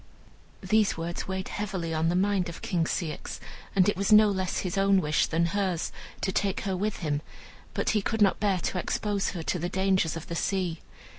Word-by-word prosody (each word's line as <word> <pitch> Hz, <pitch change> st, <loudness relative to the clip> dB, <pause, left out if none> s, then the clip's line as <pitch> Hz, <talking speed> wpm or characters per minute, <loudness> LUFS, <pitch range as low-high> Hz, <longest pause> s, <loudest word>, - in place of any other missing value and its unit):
These 215 Hz, -4 st, +2 dB
words 170 Hz, +1 st, -4 dB
weighed 190 Hz, 0 st, -3 dB
heavily 190 Hz, -5 st, -3 dB
on 160 Hz, +1 st, +1 dB
the 175 Hz, -, +1 dB
mind 190 Hz, -1 st, +1 dB
of 170 Hz, -, -9 dB
King 170 Hz, -2 st, +1 dB
Ceyx, 165 Hz, -2 st, -3 dB, 0.4 s
and 185 Hz, -2 st, +5 dB
it 205 Hz, -, +2 dB
was 195 Hz, +2 st, 0 dB
no 215 Hz, 0 st, +8 dB
less 190 Hz, -2 st, -1 dB
his 185 Hz, 0 st, -3 dB
own 195 Hz, 0 st, +4 dB
wish 155 Hz, -2 st, +2 dB
than 165 Hz, +1 st, +1 dB
hers 190 Hz, -4 st, 0 dB, 0.3 s
to 190 Hz, -, 0 dB
take 195 Hz, 0 st, 0 dB
her 195 Hz, -1 st, -1 dB
with 205 Hz, +2 st, -2 dB
him, 145 Hz, -1 st, 0 dB, 0.5 s
but -, -, +1 dB
he 215 Hz, -, +2 dB
could 225 Hz, +3 st, -2 dB
not 200 Hz, -2 st, +4 dB
bear 200 Hz, -2 st, +2 dB
to 180 Hz, -, -1 dB
expose 205 Hz, +2 st, -1 dB
her 170 Hz, -3 st, -4 dB
to 180 Hz, -, -1 dB
the 175 Hz, +2 st, -2 dB
dangers 190 Hz, -4 st, +1 dB
of 165 Hz, -, -7 dB
the 170 Hz, -, -5 dB
sea. 180 Hz, -2 st, -1 dB
190 Hz, 210 wpm, -28 LUFS, 170-200 Hz, 0.5 s, no